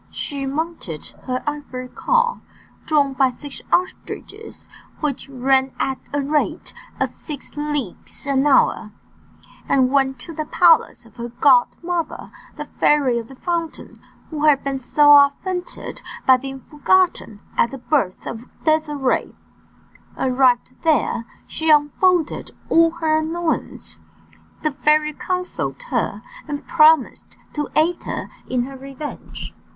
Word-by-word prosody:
She 275 Hz, -1 st, -4 dB
mounted 285 Hz, -, -4 dB
her 255 Hz, -1 st, -2 dB
ivory 285 Hz, -4 st, -5 dB
car, 480 Hz, -, +1 dB, 0.5 s
drawn 290 Hz, -3 st, +2 dB
by 265 Hz, -1 st, +3 dB
six 275 Hz, +3 st, -8 dB
ostriches 410 Hz, +4 st, -3 dB, 0.3 s
which 285 Hz, -3 st, -3 dB
ran 265 Hz, 0 st, +1 dB
at 265 Hz, -1 st, -1 dB
the 285 Hz, -1 st, -1 dB
rate 295 Hz, +2 st, -1 dB, 0.3 s
of -, -, -1 dB
six 295 Hz, -4 st, -9 dB
leagues 295 Hz, -6 st, -4 dB
an 275 Hz, 0 st, +2 dB
hour, 225 Hz, -5 st, +3 dB, 0.8 s
and 260 Hz, -2 st, +3 dB
went 270 Hz, -1 st, +2 dB
to 330 Hz, -, -8 dB
the 310 Hz, -1 st, -3 dB
palace 335 Hz, -8 st, +4 dB
of 230 Hz, -, -20 dB
her 235 Hz, 0 st, -5 dB
godmother, 290 Hz, +7 st, +1 dB, 0.3 s
the -, -, -5 dB
Fairy 275 Hz, -5 st, +2 dB
of 230 Hz, -, -8 dB
the 270 Hz, -, -12 dB
Fountain, 335 Hz, +2 st, -4 dB, 0.3 s
who 305 Hz, -1 st, -1 dB
had 290 Hz, -3 st, +4 dB
been 275 Hz, -1 st, -2 dB
so 290 Hz, +3 st, +4 dB
offended 360 Hz, +6 st, -4 dB, 0.2 s
by 260 Hz, -1 st, +7 dB
being 270 Hz, +1 st, -7 dB
forgotten 300 Hz, -, +1 dB, 0.2 s
at 235 Hz, -, +3 dB
the 270 Hz, -, -7 dB
birth 250 Hz, -7 st, -1 dB
of 230 Hz, +2 st, -7 dB, 0.2 s
Désirée. 300 Hz, -4 st, +1 dB, 0.8 s
Arrived 255 Hz, -1 st, +2 dB
there, 305 Hz, -7 st, +1 dB, 0.2 s
she 320 Hz, 0 st, -2 dB
unfolded 310 Hz, +3 st, +3 dB, 0.2 s
all 330 Hz, 0 st, +5 dB
her 320 Hz, -2 st, +1 dB
annoyances. 325 Hz, +1 st, -3 dB, 0.6 s
The 305 Hz, -, +1 dB
fairy 300 Hz, +2 st, +2 dB
consoled 365 Hz, +9 st, -3 dB
her, -, -, -1 dB, 0.2 s
and 290 Hz, -1 st, -5 dB
promised 315 Hz, -4 st, +3 dB, 0.2 s
to 295 Hz, -1 st, -3 dB
aid 335 Hz, +3 st, +2 dB
her -, -, -4 dB, 0.2 s
in 250 Hz, -1 st, +1 dB
her 270 Hz, +2 st, -7 dB
revenge. 275 Hz, +2 st, -8 dB
290 Hz, 130 wpm, -21 LUFS, 265-315 Hz, 0.8 s, by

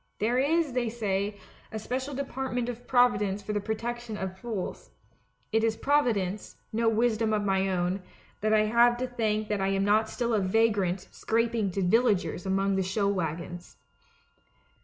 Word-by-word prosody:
There 235 Hz, +4 st, +1 dB
is, 305 Hz, 0 st, +2 dB
they 245 Hz, -2 st, 0 dB
say, 205 Hz, -2 st, -2 dB, 0.3 s
a 220 Hz, -, -4 dB
special 260 Hz, +5 st, -3 dB
department 265 Hz, -3 st, -2 dB
of 245 Hz, 0 st, -7 dB
Providence 210 Hz, -6 st, +3 dB
for 210 Hz, -, -3 dB
the 205 Hz, -, +1 dB
protection 230 Hz, +1 st, -4 dB
of 190 Hz, -1 st, -4 dB
fools; 210 Hz, -2 st, -5 dB, 0.6 s
it 220 Hz, 0 st, +2 dB
is 225 Hz, -1 st, +1 dB
Providence, 220 Hz, -9 st, 0 dB, 0.2 s
no 225 Hz, +1 st, +2 dB
wisdom 225 Hz, -1 st, +1 dB
of 210 Hz, -1 st, +1 dB
my 195 Hz, 0 st, +1 dB
own, 180 Hz, +1 st, 0 dB, 0.4 s
I 215 Hz, -, +1 dB
have 235 Hz, +3 st, +4 dB
to 255 Hz, -, -1 dB
thank 215 Hz, -3 st, -1 dB
that 210 Hz, -2 st, 0 dB
I 195 Hz, -, +1 dB
am 195 Hz, 0 st, +1 dB
not 215 Hz, +2 st, +3 dB
still 235 Hz, -2 st, -1 dB
a 215 Hz, -, +3 dB
vagrant 195 Hz, -2 st, +1 dB
scraping 230 Hz, -2 st, 0 dB
to 195 Hz, -, 0 dB
villagers 200 Hz, -2 st, +2 dB
among 195 Hz, 0 st, +1 dB
the -, -, +2 dB
show 190 Hz, +2 st, 0 dB
wagons. 175 Hz, -1 st, -3 dB
215 Hz, 160 wpm, -28 LUFS, 195-240 Hz, 0.6 s, have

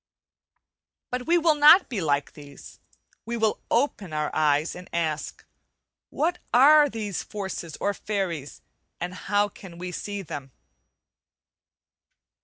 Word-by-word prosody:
But 250 Hz, 0 st, -3 dB
we 345 Hz, +1 st, +4 dB
will 330 Hz, -2 st, +4 dB
not 300 Hz, +5 st, +7 dB
be 225 Hz, -7 st, -3 dB
like 145 Hz, -3 st, 0 dB
these, 145 Hz, -2 st, -13 dB, 0.4 s
we 235 Hz, +1 st, -4 dB
will 220 Hz, -1 st, +1 dB
open 220 Hz, -, 0 dB
our 150 Hz, 0 st, -1 dB
eyes 150 Hz, 0 st, +2 dB
and 180 Hz, 0 st, -11 dB
ask, 160 Hz, -3 st, -3 dB, 0.6 s
"What 345 Hz, +3 st, -1 dB
are 290 Hz, +4 st, +7 dB
these 210 Hz, -6 st, -4 dB
forces 190 Hz, -6 st, -6 dB
or 200 Hz, -, 0 dB
fairies, 185 Hz, -10 st, -4 dB, 0.4 s
and 175 Hz, +1 st, -4 dB
how 205 Hz, +2 st, 0 dB
can 190 Hz, -3 st, -13 dB
we 180 Hz, +1 st, -6 dB
see 205 Hz, +2 st, -5 dB
them?" 135 Hz, -5 st, -8 dB
195 Hz, 125 wpm, -25 LUFS, 160-240 Hz, 0.6 s, not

